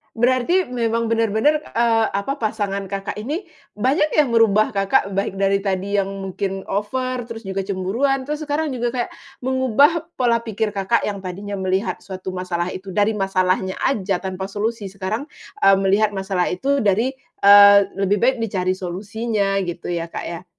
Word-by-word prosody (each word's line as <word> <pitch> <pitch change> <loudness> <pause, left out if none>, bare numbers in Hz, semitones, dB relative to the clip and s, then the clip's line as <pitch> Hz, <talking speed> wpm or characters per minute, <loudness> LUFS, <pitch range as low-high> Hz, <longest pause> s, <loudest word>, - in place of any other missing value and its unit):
Berarti, 255 +8 +2
memang 230 -2 -1
benar-benar, 230 +7 +1
eee, 230 -1 +3
apa, 275 +9 -2
pasangan 205 -3 -2
Kakak 195 +1 -5
ini 310 - -4 0.2
banyak 270 - +1
yang 295 -4 +3
merubah 220 -2 +4
Kakak, 195 -1 +1
baik 195 -1 -2
dari 195 0 +3
tadi 195 0 -1
yang 195 - +2
mungkin 195 0 -4
over, 255 +4 -2
terus 230 -1 -8
juga 195 -2 -4
cemburuan, 215 +9 0
terus 300 +3 -4
sekarang 300 +1 -1
juga 240 -2 -2
kayak 245 -2 -2 0.3
mengubah 260 +5 +2
pola 235 -2 +2
pikir 220 -2 -2
Kakak 200 +3 0
yang 205 -1 -2
tadinya 195 +2 -6
melihat 190 +3 -1
suatu 190 -1 -7
masalah 180 -1 -3
itu 190 +1 -7
dari 210 +2 +1
masalahnya 190 -1 0
aja 195 -8 0
tanpa 190 0 -4
solusi, 210 +2 -3
sekarang, 195 +6 -4 0.4
eee, 195 0 +7
melihat 205 +2 +2
masalah 190 -2 -1
itu 275 +10 0
dari, 220 +2 +2 0.3
eee, 200 0 +9 0.2
lebih 195 +1 +1
baik 260 +1 +3
dicari 185 -4 -1
solusinya, 200 +2 -2
gitu 175 0 -5
ya 170 -1 -2
Kak - - -4
ya? 170 +1 -7
205 Hz, 160 wpm, -21 LUFS, 195-235 Hz, 0.4 s, eee